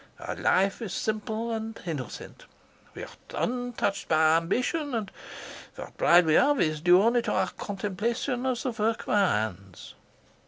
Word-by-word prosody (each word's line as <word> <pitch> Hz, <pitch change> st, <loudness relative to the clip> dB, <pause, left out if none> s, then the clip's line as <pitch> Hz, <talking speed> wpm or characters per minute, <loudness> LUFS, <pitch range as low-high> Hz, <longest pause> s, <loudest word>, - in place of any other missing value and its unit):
Our -, -, -5 dB
life 195 Hz, +4 st, +1 dB
is 215 Hz, -5 st, -5 dB
simple 220 Hz, +1 st, -3 dB
and 225 Hz, 0 st, -5 dB
innocent. 145 Hz, -8 st, -7 dB, 0.5 s
We -, -, -7 dB
are -, -, -8 dB, 0.3 s
untouched 245 Hz, -5 st, -2 dB
by 160 Hz, 0 st, +4 dB
ambition, 250 Hz, -, -1 dB
and 210 Hz, -4 st, -3 dB, 0.6 s
what -, -, -9 dB
pride 175 Hz, 0 st, +5 dB
we 155 Hz, -, +2 dB
have 285 Hz, -, +4 dB
is 155 Hz, -2 st, 0 dB
due 180 Hz, +3 st, +5 dB
only 235 Hz, +2 st, +3 dB
to -, -, -3 dB
our 185 Hz, -1 st, 0 dB
contemplation 225 Hz, +7 st, -3 dB
of 250 Hz, -2 st, -1 dB
the 255 Hz, -, -1 dB
work 225 Hz, 0 st, -1 dB
of -, -, -11 dB
our 200 Hz, -2 st, +3 dB
hands. 100 Hz, -3 st, -4 dB
210 Hz, 160 wpm, -27 LUFS, 170-235 Hz, 0.6 s, pride